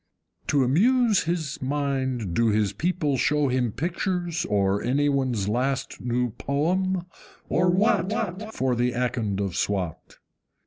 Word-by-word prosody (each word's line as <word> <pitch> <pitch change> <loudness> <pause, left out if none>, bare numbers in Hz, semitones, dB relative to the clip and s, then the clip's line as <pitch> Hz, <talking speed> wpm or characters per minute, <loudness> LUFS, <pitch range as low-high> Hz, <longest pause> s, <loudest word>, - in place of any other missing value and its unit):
To 140 -2 +3
amuse 215 - +3
his 160 -4 -2
mind 130 -7 -1
do 115 +5 +2
his 105 -2 +1
people 165 -5 0
show 150 +2 +2
him 125 -2 0
Pictures, 175 - -2
or 100 0 +1
any 145 +4 +1
one's 130 -8 0
last 130 +5 -1
new 120 0 0
poem, 180 +6 0 0.4
or 180 +2 +2
WHAT, 205 +1 0
For 130 - 0
the 120 +1 +1
Akond 115 -5 -1
of 100 -3 -2
Swat? 95 -4 -3
140 Hz, 130 wpm, -25 LUFS, 120-175 Hz, 0.4 s, To